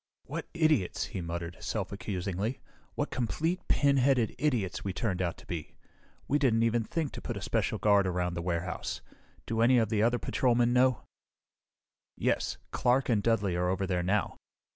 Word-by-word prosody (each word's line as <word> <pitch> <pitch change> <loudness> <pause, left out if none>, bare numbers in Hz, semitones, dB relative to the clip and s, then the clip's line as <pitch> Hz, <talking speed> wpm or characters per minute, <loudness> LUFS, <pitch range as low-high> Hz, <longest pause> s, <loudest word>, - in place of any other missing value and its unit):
"What - - -5
idiots!" 155 - +2
he 95 - -3
muttered 85 0 -5
self - - -3
accusingly. 100 +5 -3 0.4
"What - - -2
complete, 160 - -1
pinheaded 135 -4 +3
idiots 120 - 0
we 95 - -2
turned 95 -3 -1
out 85 -2 -1
to - - -15
be. 80 -3 -6 0.5
We 145 - +2
didn't 115 -5 +3
even 115 0 +2
think 155 +4 -2
to - - -8
put - - -4
a - - -6
special - - 0
guard 100 -2 +4
around 90 -1 -1
the 85 - -3
warehouse! 85 +1 -3 0.4
Do 115 0 -1
any 125 +2 +5
of 110 -3 +2
the 105 -2 +1
other 120 +2 +3
patrolmen 120 -1 +2
know?" 125 -1 +3 1.1
"Yes. - - 0
Clark 125 +2 +2
and 110 -4 +3
Dudly 100 -5 +1
are 90 +1 +1
over 95 +1 0
there 90 -2 0
now. 95 +4 0
110 Hz, 170 wpm, -30 LUFS, 90-125 Hz, 1.1 s, any